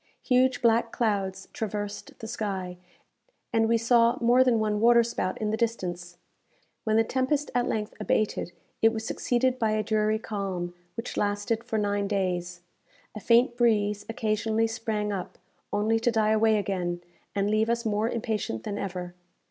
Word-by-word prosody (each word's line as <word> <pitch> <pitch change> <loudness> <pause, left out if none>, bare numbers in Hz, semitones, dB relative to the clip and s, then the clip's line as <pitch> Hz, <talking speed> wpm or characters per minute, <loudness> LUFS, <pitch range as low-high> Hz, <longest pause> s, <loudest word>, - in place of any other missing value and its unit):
Huge 255 0 +2
black 230 0 +3
clouds 195 -4 -1
traversed 205 -1 -5
the 220 - -8
sky, 195 -5 -4 0.8
and 225 -1 +3
we 230 - +4
saw 235 0 +4
more 240 +2 +5
than 250 -3 +3
one 210 -1 0
water 235 +1 +6
spout 205 -5 -2
in 215 -1 -1
the - - +1
distance. 180 -7 -3 0.7
When 215 -1 +2
the 225 - +5
tempest 265 +5 0
at 245 0 +1
length 210 -1 -2
abated, 210 -3 0 0.3
it 225 - +6
was 220 0 -4
succeeded 255 +2 0
by 220 -2 +1
a 215 0 0
dreary 215 0 +1
calm, 195 -5 -4 0.2
which 230 - -5
lasted 205 +2 0
for 220 - -2
nine 205 -1 0
days. 180 -3 -2 0.5
A 215 - -6
faint 240 +3 +4
breeze 210 -4 +2
occasionally 220 0 0
sprang 220 -2 -2
up, 185 -2 -5 0.3
only 215 +2 +1
to 235 - +2
die 220 -2 +2
away 220 0 +4
again, 180 -4 -2 0.3
and 200 +1 +1
leave 215 +1 +2
us 235 0 0
more 215 +1 +1
impatient 215 - -2
than 205 0 -4
ever. 180 -2 -5
215 Hz, 165 wpm, -27 LUFS, 205-230 Hz, 0.8 s, water